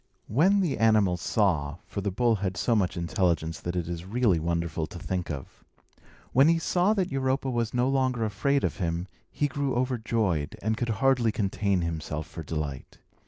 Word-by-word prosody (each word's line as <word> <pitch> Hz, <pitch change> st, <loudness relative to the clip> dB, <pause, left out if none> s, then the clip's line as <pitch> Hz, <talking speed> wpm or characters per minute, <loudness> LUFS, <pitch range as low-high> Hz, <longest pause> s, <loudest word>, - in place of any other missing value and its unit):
When 185 Hz, -, +3 dB
the 155 Hz, -, -1 dB
animal 105 Hz, -5 st, +4 dB
saw 85 Hz, -5 st, 0 dB
(for 100 Hz, -, -5 dB
the 100 Hz, -, -1 dB
bull 115 Hz, +3 st, +2 dB
had 95 Hz, 0 st, -3 dB
so 120 Hz, -, +2 dB
much 95 Hz, -4 st, 0 dB
intelligence 85 Hz, -1 st, 0 dB
that 85 Hz, +1 st, -4 dB
it 85 Hz, -2 st, -2 dB
is 85 Hz, -1 st, -4 dB
really 105 Hz, -2 st, +2 dB
wonderful 85 Hz, -1 st, -1 dB
to -, -, -9 dB
think 90 Hz, +1 st, -3 dB
of), 70 Hz, -4 st, -7 dB, 0.7 s
when 135 Hz, +4 st, +6 dB
he 165 Hz, 0 st, +4 dB
saw 180 Hz, +5 st, +2 dB
that 185 Hz, -5 st, 0 dB
Europa 135 Hz, 0 st, 0 dB
was 120 Hz, -2 st, -1 dB
no 125 Hz, +1 st, +1 dB
longer 130 Hz, -4 st, +1 dB
afraid 140 Hz, +7 st, +1 dB
of -, -, -1 dB
him, 85 Hz, 0 st, -2 dB, 0.2 s
he 145 Hz, -, 0 dB
grew 140 Hz, -2 st, -2 dB
overjoyed, 115 Hz, -, 0 dB
and 110 Hz, +1 st, +1 dB
could 120 Hz, +1 st, -2 dB
hardly 120 Hz, +1 st, +2 dB
contain 100 Hz, -2 st, 0 dB
himself 80 Hz, -2 st, -3 dB
for 80 Hz, -, -8 dB
delight. 75 Hz, -3 st, -5 dB
105 Hz, 180 wpm, -27 LUFS, 85-125 Hz, 0.7 s, when